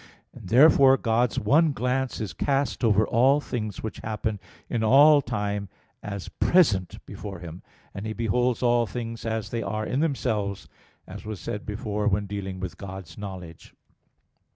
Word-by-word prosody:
And 90 - -11
therefore 135 +1 +6
God's 115 0 +1
one 150 +8 +3
glance 125 +2 -1
is 105 -7 -4
cast 135 - -1
over 110 -1 +4
all 135 +5 +3
things 110 -8 -5
which 110 - -5
happen 110 -1 -3 0.3
in 115 -2 -1
all 145 +6 +7
time 105 -5 -3 0.3
as 100 -2 -6
present 110 - +2
before 100 -3 -8
Him; 85 0 -9 0.3
and 100 +3 -6
He 110 - -3
beholds 120 +3 0
all 120 -1 +3
things 115 +2 -6
as 110 -2 -3
they 115 - -2
are 110 +1 -3
in 130 - -1
themselves, 110 -10 -1 0.4
as 100 +2 -10
was 110 -2 -6
said 105 - -6
before 105 0 -2
when 105 0 +1
dealing 95 -2 -5
with 95 - -6
God's 95 -2 -8
knowledge 95 -5 -9
(Q. - - -37
110 Hz, 160 wpm, -25 LUFS, 100-125 Hz, 0.4 s, all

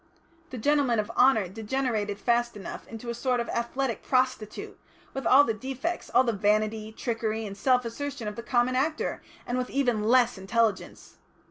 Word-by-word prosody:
The 255 - -7
gentlemen 275 -1 +2
of 215 +1 -1
honour 230 -5 +4
degenerated 215 0 -2
fast 235 +1 0
enough 195 - -8
into 230 +1 -6
a - - -3
sort 250 +1 0
of 235 - -2
athletic 235 +1 -2
prostitute, 255 -5 -1 0.3
with 270 - -3
all 275 +3 +8
the 230 - 0
defects, 265 +9 -4
all 255 - +5
the 240 - +1
vanity, 215 +1 0
trickery, 225 -1 -2
and 200 -1 -6
self 250 +4 +2
assertion 265 0 -5
of 210 - -4
the 235 - -5
common 240 +1 +1
actor, 305 +4 -1 0.2
and 245 +1 -1
with 250 - -3
even 245 -6 +1
less 245 -2 +4
intelligence. 215 +1 -1
235 Hz, 170 wpm, -27 LUFS, 215-260 Hz, 0.3 s, all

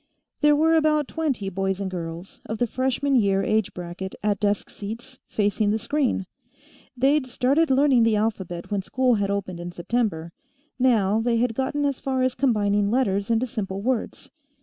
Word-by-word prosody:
There 295 -1 +5
were 320 +2 +3
about 305 -2 +3
twenty 285 -11 -2
boys 195 0 -2
and 195 -2 -3
girls, 170 0 -7
of 220 - -3
the 245 - +1
freshman 265 +3 0
year 195 -4 +3
age 215 -2 +1
bracket 180 +2 -7
at 205 -2 +1
desk 205 -1 0
seats, 235 +6 -8
facing 205 0 0
the 215 - +2
screen. 255 -4 0 0.7
They'd 275 +2 +2
started 275 +6 +2
learning 265 -2 +4
the 225 -1 +3
alphabet 195 -5 -2
when 200 -1 0
school 255 +5 +1
had 205 -3 0
opened 195 -3 -3
in 175 0 -6
September; 175 -3 -2 0.5
now 220 -4 +3
they 235 0 +1
had 235 0 +1
gotten 270 +4 -1
as 280 -2 -1
far 260 -1 -1
as 255 -1 +1
combining 205 -6 +1
letters 205 -4 0
into 230 +2 +2
simple 200 -5 -4
words. 250 -1 -2
225 Hz, 170 wpm, -24 LUFS, 195-260 Hz, 0.7 s, There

